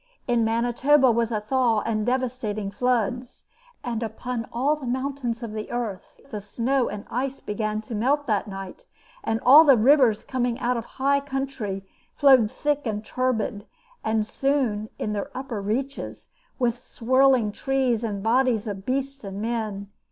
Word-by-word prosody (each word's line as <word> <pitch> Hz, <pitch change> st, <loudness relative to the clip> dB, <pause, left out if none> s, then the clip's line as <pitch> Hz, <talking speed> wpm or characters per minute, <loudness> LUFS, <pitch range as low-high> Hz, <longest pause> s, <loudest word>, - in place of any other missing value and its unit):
In 240 Hz, -2 st, +2 dB
Manitoba 245 Hz, +4 st, +3 dB
was 230 Hz, 0 st, 0 dB
a 215 Hz, -, 0 dB
thaw 230 Hz, 0 st, +1 dB
and 215 Hz, -1 st, -1 dB
devastating 240 Hz, -5 st, -1 dB
floods. 245 Hz, +1 st, -1 dB, 0.4 s
And 235 Hz, -2 st, -3 dB
upon 230 Hz, +1 st, -4 dB
all 270 Hz, +6 st, +1 dB
the 285 Hz, -4 st, -8 dB
mountains 255 Hz, -2 st, -2 dB
of 225 Hz, -2 st, -5 dB
the 215 Hz, 0 st, -5 dB
earth 230 Hz, -6 st, -5 dB
the 210 Hz, -, -3 dB
snow 240 Hz, +6 st, 0 dB
and 205 Hz, 0 st, -6 dB
ice 265 Hz, +2 st, -2 dB
began 215 Hz, 0 st, -2 dB
to 230 Hz, -, -8 dB
melt 275 Hz, +7 st, +1 dB
that 210 Hz, -4 st, 0 dB
night, 195 Hz, -, -8 dB, 0.4 s
and 225 Hz, -, 0 dB
all 290 Hz, +5 st, +10 dB
the 275 Hz, -5 st, +6 dB
rivers 245 Hz, -2 st, +4 dB
coming 245 Hz, -2 st, -1 dB
out 250 Hz, -1 st, 0 dB
of 230 Hz, -1 st, -4 dB
high 280 Hz, +1 st, +3 dB
country 270 Hz, -8 st, -4 dB, 0.3 s
flowed 260 Hz, -6 st, +6 dB
thick 290 Hz, +2 st, -1 dB
and 210 Hz, 0 st, -3 dB
turbid, 230 Hz, -4 st, -1 dB, 0.4 s
and 220 Hz, -1 st, +1 dB
soon 240 Hz, -5 st, 0 dB
in 210 Hz, -, -2 dB
their 205 Hz, -1 st, -3 dB
upper 255 Hz, -6 st, -4 dB
reaches 260 Hz, +8 st, -4 dB, 0.3 s
with 245 Hz, -2 st, 0 dB
swirling 255 Hz, -2 st, +2 dB
trees 260 Hz, -2 st, 0 dB
and 205 Hz, -3 st, -3 dB
the -, -, -9 dB
bodies 235 Hz, -1 st, +2 dB
of 200 Hz, -3 st, -6 dB
beasts 275 Hz, +1 st, -2 dB
and 195 Hz, 0 st, -6 dB
men. 215 Hz, -3 st, -3 dB
240 Hz, 160 wpm, -25 LUFS, 215-265 Hz, 0.4 s, all